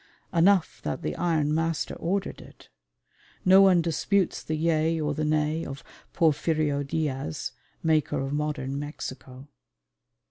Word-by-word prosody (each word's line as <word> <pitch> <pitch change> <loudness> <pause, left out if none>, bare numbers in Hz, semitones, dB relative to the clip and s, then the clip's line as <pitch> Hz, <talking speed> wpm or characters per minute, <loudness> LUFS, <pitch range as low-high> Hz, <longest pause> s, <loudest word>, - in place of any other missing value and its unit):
Enough 180 +1 +3
that 170 - -4
the - - -2
"Iron 160 -4 +1
Master" 165 0 -1
ordered 190 +3 -2
it. - - -16 0.8
No 190 +1 +8
one 185 -3 +5
disputes 180 +3 0
the 155 - -3
yea 160 0 +1
or 150 -1 -1
the 155 - -2
nay 155 +1 0
of 135 0 -7 0.3
Porfirio 155 -2 +1
Diaz, 140 - -3 0.3
maker 155 -2 +1
of 135 +1 -3
Modern 145 -2 -2
Mexico. 135 -2 -8
155 Hz, 130 wpm, -26 LUFS, 145-165 Hz, 0.8 s, No